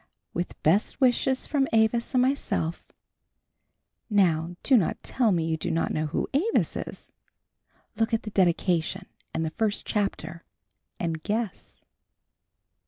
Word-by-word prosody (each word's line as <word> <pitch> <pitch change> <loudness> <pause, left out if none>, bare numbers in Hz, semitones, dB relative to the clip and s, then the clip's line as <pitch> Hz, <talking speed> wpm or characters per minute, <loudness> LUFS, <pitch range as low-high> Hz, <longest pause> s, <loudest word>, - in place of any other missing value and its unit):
With 175 +1 -4
best 190 - +2
wishes 260 0 +2
from 275 -3 +1
Avis 225 +3 +2
and 250 - +5
myself; 255 - -1 1.2
now 170 -6 +3
do 270 - +5
not 200 -9 +1
tell 240 -5 +2
me 170 -3 +1
that 165 - -1
you 160 - 0
do - - -3
not 165 - 0
know 155 0 -1
who 150 - -2
Avis 365 +12 +1
is, - - -6 0.9
look 225 +1 +1
at 225 0 0
the 215 - -6
dedication 175 -3 +1 0.3
and 160 - -1
the 160 - -3
first 215 +3 -1
chapter 200 -5 -2 0.6
and 165 -2 -2
guess. 215 0 -4
205 Hz, 140 wpm, -26 LUFS, 165-235 Hz, 1.2 s, and